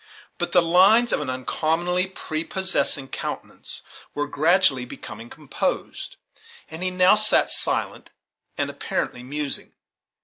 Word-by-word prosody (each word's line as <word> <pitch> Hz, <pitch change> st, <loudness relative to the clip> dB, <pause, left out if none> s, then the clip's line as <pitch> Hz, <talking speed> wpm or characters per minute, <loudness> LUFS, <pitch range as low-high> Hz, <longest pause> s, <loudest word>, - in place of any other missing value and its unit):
But 175 Hz, -, -2 dB
the 180 Hz, -, +5 dB
lines 195 Hz, +8 st, +5 dB
of -, -, +1 dB
an 145 Hz, -, -4 dB
uncommonly 165 Hz, +8 st, 0 dB
prepossessing 165 Hz, -4 st, -2 dB
countenance -, -, -6 dB, 0.3 s
were 145 Hz, -, -1 dB
gradually 155 Hz, -3 st, +3 dB
becoming 115 Hz, -1 st, -9 dB
composed; -, -, -4 dB, 0.6 s
and 160 Hz, +2 st, -7 dB
he 185 Hz, -, +1 dB
now 185 Hz, +1 st, +5 dB
sat 215 Hz, 0 st, +4 dB
silent, -, -, -1 dB, 0.5 s
and -, -, -1 dB
apparently 125 Hz, -, -3 dB
musing. 145 Hz, +2 st, -4 dB
165 Hz, 115 wpm, -23 LUFS, 140-185 Hz, 0.6 s, the